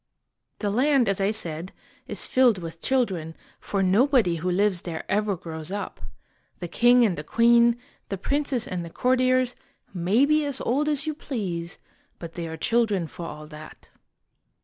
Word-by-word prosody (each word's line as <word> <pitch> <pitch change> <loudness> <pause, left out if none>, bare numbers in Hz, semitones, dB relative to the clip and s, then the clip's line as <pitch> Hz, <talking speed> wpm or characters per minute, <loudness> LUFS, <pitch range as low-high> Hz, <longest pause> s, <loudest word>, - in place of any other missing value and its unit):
The 205 -2 -2
land, 260 +2 +3
as 195 0 0
I 195 - +2
said, 175 -5 -5 0.3
is - - -3
filled 250 -5 +4
with 165 -2 -8
children, 190 -12 -1 0.2
for 195 -1 -1
nobody 210 -2 +3
who 175 +3 -2
lives 190 0 +1
there 165 -2 -5
ever 205 -1 0
grows 160 -1 -7
up. 205 +1 -5 0.6
The 175 - -4
king 240 +6 +5
and 195 -5 +1
the 150 - -6
queen, 235 +4 +4 0.3
the 195 - -3
princes 275 +3 -1
and 180 -2 -3
the 170 - -7
courtiers, 255 +3 +2 0.4
may 195 +9 +3
be 305 +1 +3
as 285 -3 -3
old 290 +5 +1
as 295 0 0
you 310 - -1
please, 185 - -4 0.4
but 165 -1 -8
they 170 -1 -5
are 160 0 -6
children 220 -2 +1
for 170 +2 -8
all 150 -1 -8
that. 155 0 -12
205 Hz, 170 wpm, -25 LUFS, 170-250 Hz, 0.6 s, king